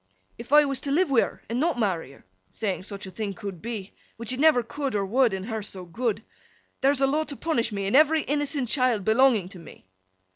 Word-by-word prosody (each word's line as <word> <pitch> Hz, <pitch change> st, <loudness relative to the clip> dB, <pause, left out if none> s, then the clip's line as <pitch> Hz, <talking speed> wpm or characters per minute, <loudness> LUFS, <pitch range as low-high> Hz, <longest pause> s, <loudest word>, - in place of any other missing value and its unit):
'If 235 Hz, +2 st, -10 dB
I 295 Hz, 0 st, +7 dB
was 275 Hz, -2 st, -2 dB
to 280 Hz, -, -2 dB
live 340 Hz, +1 st, +2 dB
wi' 250 Hz, -, +5 dB
her -, -, -5 dB
an' 235 Hz, +2 st, -2 dB
not 320 Hz, -2 st, +1 dB
marry 180 Hz, -, -1 dB
her—saying 95 Hz, -, -6 dB
such 200 Hz, 0 st, -8 dB
a 190 Hz, -, -9 dB
thing 200 Hz, 0 st, -4 dB
could 195 Hz, -5 st, -7 dB
be, 215 Hz, -4 st, -6 dB, 0.2 s
which 230 Hz, +1 st, -2 dB
it 255 Hz, -, -5 dB
never 300 Hz, -5 st, +5 dB
could 275 Hz, +1 st, -4 dB
or 200 Hz, -1 st, 0 dB
would, 245 Hz, +4 st, +3 dB
an' 190 Hz, -1 st, -4 dB
her 220 Hz, +1 st, -4 dB
so 190 Hz, -3 st, -4 dB
good—there's 245 Hz, +6 st, -3 dB
a -, -, +5 dB
law 295 Hz, +3 st, +1 dB
to 285 Hz, -, -6 dB
punish 245 Hz, -7 st, -1 dB
me, 200 Hz, -1 st, -3 dB
in 200 Hz, -, 0 dB
every 310 Hz, +2 st, +5 dB
innocent 290 Hz, -2 st, -1 dB
child 245 Hz, -6 st, +1 dB
belonging 225 Hz, -4 st, +4 dB
to 185 Hz, -, -11 dB
me? 165 Hz, -, -14 dB
235 Hz, 220 wpm, -26 LUFS, 200-275 Hz, 0.2 s, I